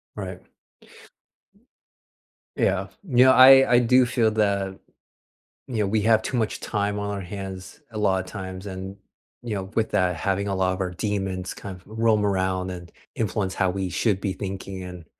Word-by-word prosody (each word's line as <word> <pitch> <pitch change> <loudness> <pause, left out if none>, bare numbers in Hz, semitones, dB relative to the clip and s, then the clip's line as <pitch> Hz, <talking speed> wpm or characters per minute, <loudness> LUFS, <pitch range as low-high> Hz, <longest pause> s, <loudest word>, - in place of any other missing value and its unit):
Right. - - -7 2.1
Yeah. - - +1 0.2
You 130 -8 +4
know, 130 - +7
I 135 +1 +8
I 120 - +7
do 125 +1 +4
feel 115 -2 +1
that, 100 -3 0 0.9
you 125 - -4
know, 105 - +1
we 110 +1 +1
have 110 +1 +4
too 120 +3 -3
much 110 -2 -1
time 105 0 -2
on 100 - -3
our 100 - -4
hands 95 +5 -8
a 110 - -7
lotta 95 -3 +1
times 95 -1 -7
and, 95 0 -7 0.4
you 115 -3 -4
know, 95 - -3
with 110 -1 0
that 90 -1 +1
having 100 +4 -1
a 95 - -1
lot 95 0 +1
of 95 - -4
our 90 -1 -2
demons 95 -1 -3
kind 95 -2 -8
of - - -24
roam 110 -1 +1
around 95 -1 0
and 85 -1 -9 0.2
influence 105 -3 -1
how 95 -1 +1
we 95 0 -2
should 95 +3 0
be 95 -1 -2
thinking 95 -1 -6
and 90 -2 -9
100 Hz, 180 wpm, -24 LUFS, 95-110 Hz, 2.1 s, I